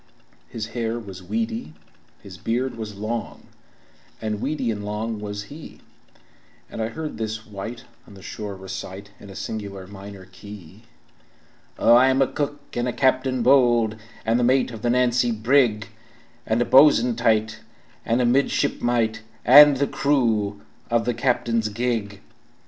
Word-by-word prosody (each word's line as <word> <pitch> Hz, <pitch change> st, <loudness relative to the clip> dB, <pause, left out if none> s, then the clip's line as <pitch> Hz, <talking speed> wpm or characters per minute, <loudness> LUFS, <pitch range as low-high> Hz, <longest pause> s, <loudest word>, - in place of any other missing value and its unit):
His 110 Hz, -1 st, -6 dB
hair 115 Hz, -1 st, -2 dB
was 100 Hz, -5 st, -9 dB
weedy, 110 Hz, -3 st, -4 dB, 0.5 s
his 95 Hz, -2 st, -10 dB
beard 125 Hz, +3 st, -2 dB
was 110 Hz, -2 st, -7 dB
long, 110 Hz, +3 st, -5 dB, 0.8 s
And 105 Hz, -1 st, -3 dB
weedy 135 Hz, -5 st, -1 dB
and 105 Hz, -1 st, -5 dB
long 105 Hz, +1 st, -4 dB
was 105 Hz, 0 st, -5 dB
he, 150 Hz, +9 st, -12 dB, 0.9 s
And -, -, -5 dB
I 110 Hz, -, 0 dB
heard 150 Hz, 0 st, -6 dB
this 110 Hz, 0 st, -4 dB
wight 110 Hz, +4 st, -7 dB, 0.2 s
on 100 Hz, -, -14 dB
the 95 Hz, -, -14 dB
shore 105 Hz, -1 st, -6 dB
recite, 95 Hz, +1 st, -8 dB
In 100 Hz, -, -13 dB
a 95 Hz, -, -11 dB
singular 100 Hz, -3 st, -6 dB
minor 100 Hz, 0 st, -11 dB
key: 100 Hz, +1 st, -13 dB, 0.9 s
"Oh, -, -, +5 dB
I 125 Hz, +2 st, +6 dB
am 130 Hz, 0 st, +2 dB
a 135 Hz, -, +5 dB
cook 145 Hz, +1 st, -3 dB
and 120 Hz, +1 st, -1 dB
a 125 Hz, -, -2 dB
captain 130 Hz, -2 st, +1 dB
bold, 120 Hz, -4 st, +4 dB, 0.3 s
And 115 Hz, +2 st, +2 dB
the -, -, +1 dB
mate 130 Hz, +1 st, +2 dB
of 110 Hz, -3 st, -9 dB
the 120 Hz, -, 0 dB
Nancy 125 Hz, -1 st, +2 dB
brig, 110 Hz, -2 st, +2 dB, 0.6 s
And 110 Hz, +1 st, +1 dB
a -, -, -5 dB
bo'sun 130 Hz, -4 st, +5 dB
tight, 110 Hz, -2 st, +1 dB, 0.4 s
and 120 Hz, +2 st, +1 dB
a -, -, +2 dB
midshipmite, 120 Hz, -3 st, +1 dB, 0.2 s
And 145 Hz, +2 st, +9 dB
the 140 Hz, -, +2 dB
crew 115 Hz, -9 st, 0 dB, 0.3 s
of 115 Hz, -1 st, +1 dB
the 120 Hz, -, 0 dB
captain's 120 Hz, -2 st, 0 dB
gig." 105 Hz, -3 st, -3 dB
115 Hz, 155 wpm, -23 LUFS, 105-125 Hz, 0.9 s, And